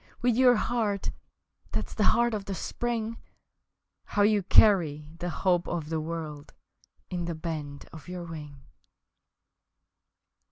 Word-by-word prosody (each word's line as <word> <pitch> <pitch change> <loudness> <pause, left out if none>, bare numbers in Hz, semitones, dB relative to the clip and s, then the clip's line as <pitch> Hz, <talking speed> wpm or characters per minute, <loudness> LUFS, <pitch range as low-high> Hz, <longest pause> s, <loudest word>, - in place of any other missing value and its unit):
with 245 -2 +3
your 250 0 +6
heart 215 -4 0 0.6
That's - - -2
the 210 - +1
heart 235 0 +3
of 205 -2 -3
the 195 - -3
Spring 230 +3 -3 0.9
How 205 - +1
you 210 0 +4
carry 165 -7 +4
the 175 - -2
hope 175 -1 +1
of 160 -3 -3
the 160 -1 -1
world 155 -2 -6 0.6
In 175 -1 -2
the 170 -1 -3
bend 155 -3 -5
of 160 +1 -11
your 180 -1 -5
wing! 150 -5 -9
175 Hz, 130 wpm, -28 LUFS, 160-215 Hz, 0.9 s, your